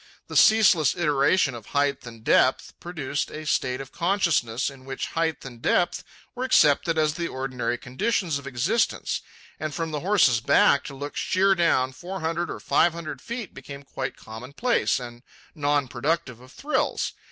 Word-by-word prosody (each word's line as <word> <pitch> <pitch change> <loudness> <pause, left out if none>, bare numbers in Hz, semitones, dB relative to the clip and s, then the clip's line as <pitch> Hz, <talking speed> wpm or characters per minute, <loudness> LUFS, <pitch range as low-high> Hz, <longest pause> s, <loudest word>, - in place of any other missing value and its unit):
The - - -7
ceaseless 195 -9 +5
iteration 150 -1 +2
of 115 -4 -10
height 140 -2 0
and 115 -1 -11
depth - - +2
produced 150 -5 -3
a 155 0 -8
state 130 -3 0
of 135 -1 -8
consciousness 170 - 0
in 135 -1 -15
which 135 0 -5
height 160 -3 -1
and 120 -3 -10
depth 175 - +1 0.3
were 250 - -4
accepted 160 - +3
as 155 -1 +2
the 170 +2 -3
ordinary 125 -3 -3
conditions 140 - -1
of 140 - -11
existence; 140 - 0 0.4
and 155 -2 -4
from 165 +1 -3
the 150 - -2
horse's 170 - +3
back 140 - +4
to 140 - -7
look 145 +2 -7
sheer 195 +1 +2
down 165 -8 +2
four 185 +7 -7
hundred 165 +1 -2
or - - -5
five 170 - +2
hundred 165 -2 -7
feet 235 -4 -6
became 140 0 -10
quite 135 -1 -5
commonplace 135 - -1
and 120 -1 -9 0.3
non 145 -3 0
productive 130 -1 -2
of 130 +1 -16
thrills. 300 - -1
145 Hz, 165 wpm, -25 LUFS, 130-170 Hz, 0.4 s, ceaseless